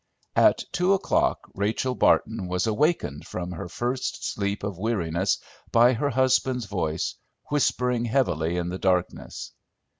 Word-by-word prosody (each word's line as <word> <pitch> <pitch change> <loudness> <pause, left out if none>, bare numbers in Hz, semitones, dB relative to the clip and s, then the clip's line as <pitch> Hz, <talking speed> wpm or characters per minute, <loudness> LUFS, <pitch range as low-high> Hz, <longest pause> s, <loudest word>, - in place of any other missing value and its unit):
At - - +5
two 180 +2 +2
o'clock 195 - +1
Rachel 110 +6 -1
Barton 110 -5 +2
was 90 0 0
awakened 110 - 0
from 90 0 -5
her 85 0 -6
first 125 +5 -3
sleep 100 0 -2
of 100 -3 -4
weariness 95 -4 0 0.3
by 120 +2 +6
her 140 +5 0
husband's 130 -1 +2
voice, 85 -5 -2 0.4
whispering 125 -4 +1
heavily 90 - +1
in 85 0 -2
the 90 +1 -4
darkness. 90 -2 -1
105 Hz, 130 wpm, -25 LUFS, 90-125 Hz, 0.4 s, by